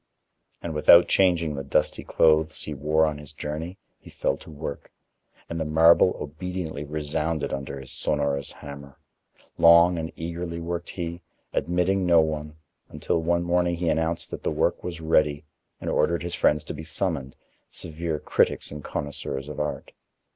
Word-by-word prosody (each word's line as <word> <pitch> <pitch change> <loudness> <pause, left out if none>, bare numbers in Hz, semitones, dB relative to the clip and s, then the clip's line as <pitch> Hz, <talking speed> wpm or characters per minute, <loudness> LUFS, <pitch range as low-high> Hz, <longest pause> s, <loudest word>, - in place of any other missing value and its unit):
And 85 - -4
without 85 +3 +7
changing 85 -5 +2
the 70 -1 -4
dusty 70 - 0
clothes 80 0 +2
he 75 - -5
wore 75 +3 +2
on 75 -1 -2
his 75 0 -10
journey, 75 +5 -5 0.2
he - - -15
fell - - -1
to - - -14
work, 75 -2 -7 0.6
and 85 - -4
the - - 0
marble 80 +3 +5
obediently 80 0 -5
resounded 75 0 -2
under 70 0 -5
his 65 -1 -10
sonorous 70 -2 -1
hammer. 70 -1 -11 0.6
Long 85 +1 +7
and 80 0 -4
eagerly 85 +1 -5
worked 85 +1 -4
he, 85 -1 -5 0.3
admitting 90 +2 +1
no 85 -1 +6
one, 75 -1 -1 0.3
until 85 - -1
one 85 +1 +1
morning 85 0 +1
he 85 0 -1
announced 80 +1 -1
that - - -6
the - - -1
work - - 0
was 85 -2 -5
ready 75 -2 +2 0.3
and - - -7
ordered 85 0 +1
his 85 - -4
friends 75 0 +2
to - - -6
be 75 - -7
summoned, 80 -4 -3 0.3
severe 80 -1 -4
critics - - +1
and 75 -1 -7
connoisseurs 70 -1 -4
of 75 - -7
art. 75 0 -3
80 Hz, 160 wpm, -25 LUFS, 75-85 Hz, 0.6 s, without